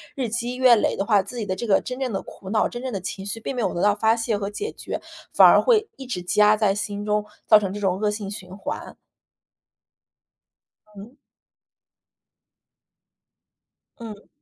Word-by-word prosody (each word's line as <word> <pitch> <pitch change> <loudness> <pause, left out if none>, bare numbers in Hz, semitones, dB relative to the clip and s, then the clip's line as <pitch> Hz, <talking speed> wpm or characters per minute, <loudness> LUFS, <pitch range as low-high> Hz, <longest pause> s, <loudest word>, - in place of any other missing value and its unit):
日 255 -6 -2
积 240 +2 -3
月 255 -2 +6
累 215 - +1
的 195 - -1
话， 205 -3 +4
自 220 +6 -10
己 220 - -3
的 185 - -1
这 235 - -5
个 195 - +3
真 250 +1 -6
正 260 -3 -2
的 195 - -2
苦 190 - -12
恼、 215 -1 +2
真 240 0 -7
正 260 - -3
的 195 - -2
情 190 +1 -6
绪 205 +3 -4
并 255 +4 -5
没 245 - -2
有 - - -1
得 175 - -3
到 205 0 +4
发 220 +2 +2
泄 225 -2 -1
和 200 -1 -3
解 415 - -5
决， - - -6 0.3
反 - - +8
而 - - +7
会 445 -3 +3
一 265 - -8
直 240 -8 -4
积 180 +4 -2
压 210 0 +6
在 205 -3 +2
心 205 0 -4
中， 210 0 0 0.2
造 215 - +8
成 195 -2 -3
这 205 - -5
种 190 -1 0
恶 210 -1 +1
性 205 -2 -5
循 185 -2 -9
环。 200 - -6 2.0
嗯。 215 +7 -12 2.8
嗯。 215 -3 -10
210 Hz, 210 characters per minute, -23 LUFS, 200-240 Hz, 2.8 s, 反